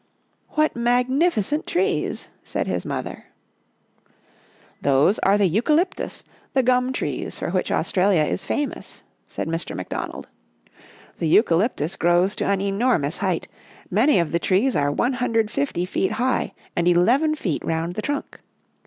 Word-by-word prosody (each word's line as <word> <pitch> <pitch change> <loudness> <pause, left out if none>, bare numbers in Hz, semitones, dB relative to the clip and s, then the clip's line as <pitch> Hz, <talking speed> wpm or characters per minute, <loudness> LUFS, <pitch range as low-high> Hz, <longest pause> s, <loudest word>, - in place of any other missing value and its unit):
" - - -44
What 310 0 +2
magnificent 250 - +1
trees," 385 +4 -1
said - - -2
his - - -3
mother. - - -5 0.8
" - - -37 0.7
Those 140 +9 +3
are 200 +1 +3
the 205 - +3
eucalyptus, 300 - 0 0.3
the 265 - +4
gum 250 +1 +2
trees 260 - -3
for - - -3
which - - -1
Australia 185 -3 +2
is 150 - -2
famous," 290 -1 -4 0.2
said - - -4
Mr. 165 +1 -3
McDon 90 - -4
ald. - - -9 0.5
" - - -25
The 165 - 0
eucalyptus 170 - +2
grows 175 +4 +2
to - - -1
an 200 -1 +1
enormous 195 - 0
height, 185 -4 -1 0.4
many 220 +6 +4
of 170 -4 +1
the 170 - +1
trees 205 +10 +2
are 145 0 +2
150 225 - 0
feet 190 +1 -1
high 255 +1 0 0.2
and 170 0 +1
eleven 245 - +3
feet 180 - -3
around 165 +1 -2
the 215 - -4
trunk. 290 +4 -4
200 Hz, 145 wpm, -23 LUFS, 175-255 Hz, 0.8 s, the